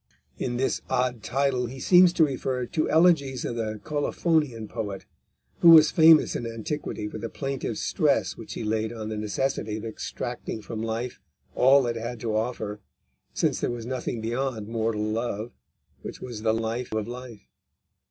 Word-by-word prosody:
In 120 -1 -2
this 135 +1 0
odd 125 -2 0
title 130 +1 0
he 130 +3 -8
seems 180 +4 +6
to 165 -3 +5
refer 130 -2 -2
to 155 +5 -1
elegies 155 -6 +3
of 120 - -3
the 110 -2 -3
Colophonian 150 -5 0
poet, 105 -4 -5 0.5
who 170 - +7
was 155 -2 +9
famous 160 -1 +6
in 120 - -3
antiquity 115 -1 -4
for 110 - -7
the 115 - -4
plaintive 135 -5 -4
stress - - +1
which - - -9
he - - -4
laid 110 0 -1
on 110 -2 -6
the 110 - -3
necessity 110 0 -2
of 110 - -7
extracting 110 0 -5
from 110 -1 -5
life 115 +2 -3 0.3
all 135 +1 +5
it 120 -1 -2
had 120 +1 -5
to 110 -2 -1
offer, 110 -2 -2 0.6
since - - +1
there - - -1
was 120 -2 -5
nothing 125 -2 -3
beyond 120 -1 -2
mortal 110 -1 -1
love, 110 +1 -2 0.5
which - - -8
was 120 -4 -7
the 110 0 +2
life 115 +2 -2
of 110 0 -1
life. 120 -3 -9
120 Hz, 170 wpm, -26 LUFS, 110-135 Hz, 0.6 s, was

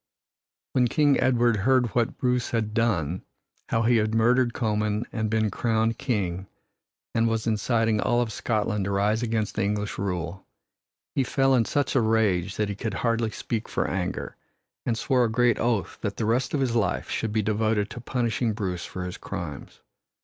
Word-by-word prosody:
When 125 -2 +3
King 145 +2 +3
Edward 120 -3 +3
heard 125 +5 +3
of 115 - -5
what 120 -2 0
Bruce 125 -1 0
had 110 -2 -1
done 95 - 0 0.5
how 115 - +1
he 120 +1 +4
had 110 0 +1
murdered 120 +2 +3
Comyn 105 -1 -1
and 110 -1 -1
been 110 -1 +1
crowned 115 +1 0
king 95 -6 -2 0.7
and 115 0 +2
was 115 -1 -1
inciting 115 0 +1
all 120 -1 +2
of 120 -2 0
Scotland 105 -2 -1
to 100 - -2
rise 105 +3 +1
against 110 -3 -1
the 110 - -1
English 105 +1 -2
rule, 90 -1 -3 0.7
he 135 - +2
fell 135 +1 +2
in 120 -3 +4
such 145 +4 0
a 130 - +3
rage 105 -4 +1
that 105 - 0
he - - -2
could 105 0 -4
hardly 115 +1 0
speak 115 0 -4
for - - 0
anger, 90 -1 -3 0.5
and 115 -2 +1
swore 125 +1 +2
a - - 0
great 120 +1 +3
oath 115 -4 -1
that 100 -1 -3
the 110 - -1
rest 120 +6 +1
of 140 - 0
his 125 -3 0
life 100 -6 0
should 110 - -1
be 110 0 +1
devoted 110 0 0
to 120 - -7
punishing 120 -2 0
Bruce 95 -5 -3
for 90 -1 -5
his 90 - -6
crimes. 85 -7 -7
110 Hz, 185 wpm, -26 LUFS, 105-120 Hz, 0.7 s, he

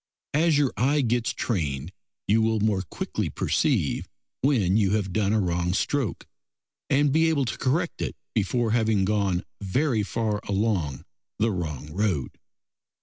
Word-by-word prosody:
As 155 0 +3
your 145 -3 +2
eye 145 +4 +3
gets 120 -2 +1
trained 75 - -2 0.4
you 110 +3 +4
will 110 0 +2
more 105 -2 +1
quickly 90 - -3
perceive - - 0 0.3
when 115 -9 +3
you 105 -2 +3
have 100 -4 -1
done 105 -1 +1
a 110 - +3
wrong 90 -1 0
stroke, 140 0 -1 0.6
and 140 +1 +3
be 160 +3 +4
able 145 -4 +1
to 115 - -3
correct 155 +6 0
it - - -2 0.2
before 115 +2 +1
having 110 -4 +2
gone 100 -3 +1 0.2
very 115 +4 +1
far 105 0 -1
along 95 - -1 0.3
the 110 +1 +2
wrong 75 -5 -4
road. 95 - -1
110 Hz, 145 wpm, -26 LUFS, 95-125 Hz, 0.6 s, you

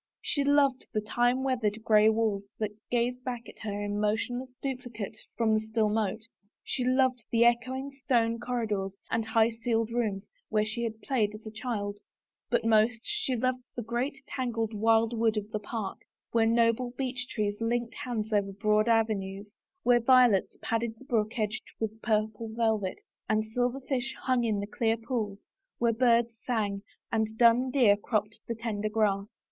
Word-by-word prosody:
She 295 -2 0
loved 280 -2 +3
the 215 - +2
time 245 +4 +1
weathered 225 -5 0
gray 215 -1 +6
walls 215 -2 -1
that 215 -1 -2 0.2
gazed 245 +1 0
back 245 -2 -4
at - - -13
her 205 -2 -3
in 205 0 -2
motionless 245 +5 -1
duplicate 245 -6 -5 0.2
from 225 -2 +3
the 215 - +4
still 220 0 0
moat, 215 0 -1 0.4
she 255 - -2
loved 255 -1 +2
the 235 0 +4
echoing 255 +3 +1
stone 230 -2 +2
corridors 210 -6 -2
and 225 - +1
high 225 +1 +3
ceiled 225 0 -1
rooms 220 -4 -1 0.2
where 215 0 +2
she 220 +2 -3
had 220 -1 -5
played 215 -6 0
as 215 - -12
a 220 - -6
child, 210 -3 -3 0.5
but 235 -2 +1
most 225 +1 +3
she 420 -11 -1
loved 255 +1 0
the 240 - -3
great 240 +5 -2
tangled 230 -4 -2
wildwood 225 +1 +2
of 210 0 -4
park, 210 -2 -4 0.3
where 225 -1 +3
noble 235 +2 +2
beech 255 -2 -3
trees 205 0 -2
linked 235 0 0
hands 225 -3 -3
over 200 -1 +2
broad 210 +2 +2
avenues, 205 -3 0 0.3
where 245 -1 +5
violets 240 -5 +4
padded 230 0 -1
the 265 - -15
brook 225 -4 0
edge 215 -1 -1 0.2
with 220 0 -3
purple 220 0 0
velvet, 220 -4 0 0.3
and 215 0 +2
silver 245 +4 -1
fish 265 -1 -2
hung 255 -2 +2
in 210 -3 0
the - - -3
clear 225 +2 0
pools, 225 -4 -3 0.3
where 235 -1 +2
birds 235 0 +3
sang 205 -5 -1 0.3
and 220 -1 0
dun 240 +2 +5
deer 245 -7 +5
cropped 210 0 -2
the 230 - -2
tender 215 -2 -2
grass. 205 -2 +1
225 Hz, 165 wpm, -29 LUFS, 215-245 Hz, 0.5 s, gray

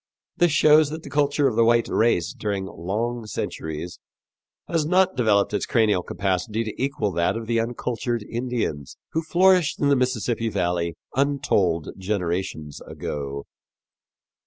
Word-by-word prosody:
This 175 -2 +3
shows 155 0 +5
that 160 +1 -6
the 140 - -10
culture 145 0 +2
of 120 - -1
the 115 - +4
white 115 0 +3
race 110 -7 +1
during 100 -2 -3
long 110 +6 -3
centuries 80 -4 -5 0.7
has 165 -2 +1
not 185 +4 +3
developed 105 -5 +2
its 105 - -1
cranial 110 -5 +2
capacity 100 +5 -1
to 110 +1 -6
equal 140 -7 -1
that 85 +5 0
of 115 - -5
the 115 0 +1
uncultured 120 0 -2
Indians 115 - -3
who 160 - 0
flourished 180 -1 +3
in 145 - +2
the 140 - +5
Mississippi 120 -3 0
valley 85 -4 -1 0.2
untold 105 - +1
generations 90 -6 -3
ago. 70 -1 -5
115 Hz, 140 wpm, -24 LUFS, 95-140 Hz, 0.7 s, shows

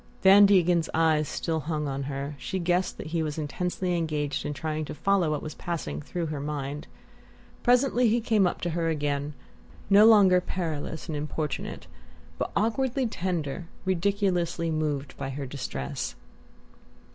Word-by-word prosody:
Van 200 +1 +8
Degen's 175 -4 +3
eyes 155 -2 +3
still 160 -1 -2
hung 150 -1 -2
on 135 0 -3
her: 140 +1 -4
she 190 - -3
guessed 180 +1 0
that - - -7
he 165 - +1
was 155 -1 -3
intensely 180 +4 -2
engaged 150 -4 -1
in - - -2
trying 155 +2 -3
to 150 - -6
follow 195 -1 +2
what 150 -1 -2
was 155 - -5
passing 115 - -4
through 175 - -4
her 150 -2 -4
mind. 145 +1 -4 0.7
Presently 250 0 +3
he 230 +2 +3
came 215 -4 +3
up - - -3
to 175 - -1
her 165 0 0
again, 145 -1 -2 0.6
no 205 +2 +8
longer 195 -5 +6
perilous 160 -3 -4
and 160 - -3
importunate, 150 0 -4 0.5
but - - -1
awkwardly 255 +4 +1
tender, 175 - -3 0.2
ridiculously 180 -3 0
moved 150 -3 -2
by 135 - -4
her 140 +1 -4
distress. 125 - -4
165 Hz, 155 wpm, -27 LUFS, 150-185 Hz, 0.7 s, Van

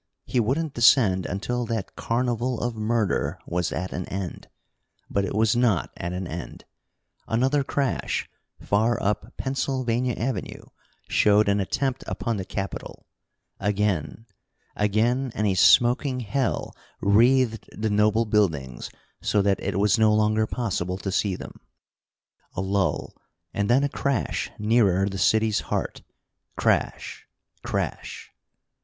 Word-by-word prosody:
He 125 - 0
wouldn't 140 +7 0
descend 110 -6 +4
until 120 +6 -2
that 110 -4 -4
carnival 120 +1 -1
of 120 -1 -2
murder 110 -2 0
was 90 0 -1
at 90 +1 -4
an 90 - -5
end. 95 -2 -5 0.6
But 100 0 +1
it 95 - -4
was 110 +1 +3
not 120 -8 +2
at 85 - -4
an 90 +1 -4
end. 85 0 -7 0.6
Another 130 +5 +2
crash, 135 -2 -1 0.3
far 110 +3 +1
up 105 +3 -2
Pennsylvania 130 -3 -1
Avenue, 115 -5 -4 0.4
showed 105 0 +4
an 100 0 +2
attempt 130 +6 -1
upon 115 -3 -2
the 95 - -4
Capitol. 95 0 -6 0.5
Again 105 0 -1 0.5
again, 115 +5 +1
and 105 - 0
a 100 - +2
smoking 125 - +4
hell 120 +3 -2 0.2
wreathed 115 +3 +3
the 110 0 -2
noble 105 +2 +3
buildings 80 - 0 0.3
so 105 -2 +2
that 100 -1 +2
it 100 -1 -2
was 105 +3 +3
no 110 -1 +5
longer 110 0 +2
possible 95 -7 -2
to 95 0 -4
see 100 0 0
them. - - -10 1.0
A - - -1
lull, 95 0 -1 0.4
and 100 0 -1
then 130 +4 +4
a - - +3
crash 140 -2 -1
nearer 105 -3 +3
the 95 -1 -4
city's 110 0 +3
heart. - - -2 0.6
Crash! - - -1 0.3
Crash! - - -4
110 Hz, 130 wpm, -25 LUFS, 100-120 Hz, 1.0 s, no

